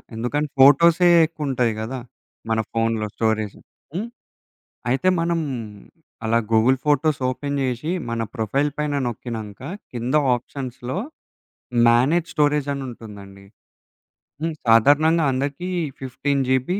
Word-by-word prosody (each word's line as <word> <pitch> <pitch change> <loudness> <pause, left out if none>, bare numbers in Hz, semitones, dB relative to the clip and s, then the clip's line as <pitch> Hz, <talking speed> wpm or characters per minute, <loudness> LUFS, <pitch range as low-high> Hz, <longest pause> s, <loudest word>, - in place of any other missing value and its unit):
ఎందుకంటే 145 +6 -1
ఫోటోసే 170 +6 +6 0.2
యెక్కువుంటాయి 135 -7 -1
గదా! 120 +4 -4 0.5
మన 110 0 +1
ఫోనులో 115 -1 0
స్టోరెజు 110 -2 -1 0.4
హ్మ్. 210 +6 -2 0.8
అయితే 135 +9 +1
మనం 170 0 0 0.9
అలా 115 +1 +2
గూగుల్ 115 +4 +4
ఫోటోస్ 150 0 +2
ఓపెన్ 140 +2 -3
జేసి, 130 +4 -2 0.2
మన 115 0 -2
ప్రొఫైల్ 135 +6 0
పైన 150 -1 -1
నోక్కినంక 110 -3 -6 0.3
కింద 120 +1 -3 0.2
ఆప్షన్స్‌లో 125 +2 -6 0.9
మ్యానేజ్ 140 +9 +3
స్టోరేజని 145 -2 +1
ఉంటుందండి. 100 -4 -11 1.0
హ్మ్. 165 -1 -1
సాధారణంగా 145 +8 +5
అందరికి, 140 +7 -3 0.3
15 135 +2 -1
జీబీ 130 +9 +1
130 Hz, 105 wpm, -22 LUFS, 115-150 Hz, 1.0 s, ఫోటోసే